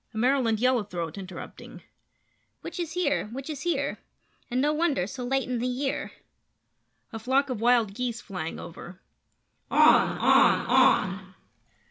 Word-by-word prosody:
[A - - -5
Maryland 240 -2 +2
Yellow 250 -1 +2
Throat 170 -5 -5
Interrupting]: 185 -3 -10 0.8
Witches 340 -3 -5
here! 285 -10 0
Witches 270 +3 -6
here! 345 +3 -1 0.5
And 250 - -1
no 295 +3 +2
wonder 305 - 0
so 250 +6 -7
late 265 +2 -1
in 250 -1 -2
the 245 - -1
year! 265 +2 -3 1.0
[A 225 - -5
Flock 265 +4 +1
of 230 -4 -4
Wild 235 -4 +3
Geese 240 0 -3
Flying 180 -7 -6
Over]: 175 +2 -10 0.7
On! - - +5
On! - - +4
On! 190 -1 +2
245 Hz, 135 wpm, -26 LUFS, 200-270 Hz, 1.0 s, On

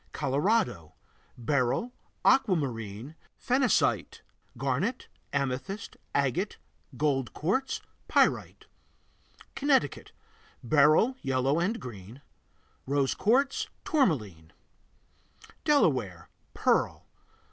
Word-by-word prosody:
Colorado 140 - 0 0.4
Beryl, 140 - 0 0.3
aquamarine, 130 - +1 0.2
phenacite, 255 -1 +1 0.4
garnet, 145 - -1 0.2
amethyst, 140 - -3 0.2
agate, 140 - 0 0.4
gold 135 -3 0
quartz, 220 - -1 0.3
pyrite. - - +1 0.9
Connecticut 280 -1 +1 0.5
Beryl, 155 - +4
yellow 135 +2 +1
and 205 +7 0
green; 115 +3 -10 0.6
rose 140 -1 +1
quartz, 265 +7 +1 0.2
tourmaline 110 - 0 1.1
Delaware 130 - +1 0.3
Pearl. - - +1
145 Hz, 70 wpm, -28 LUFS, -, 1.1 s, Beryl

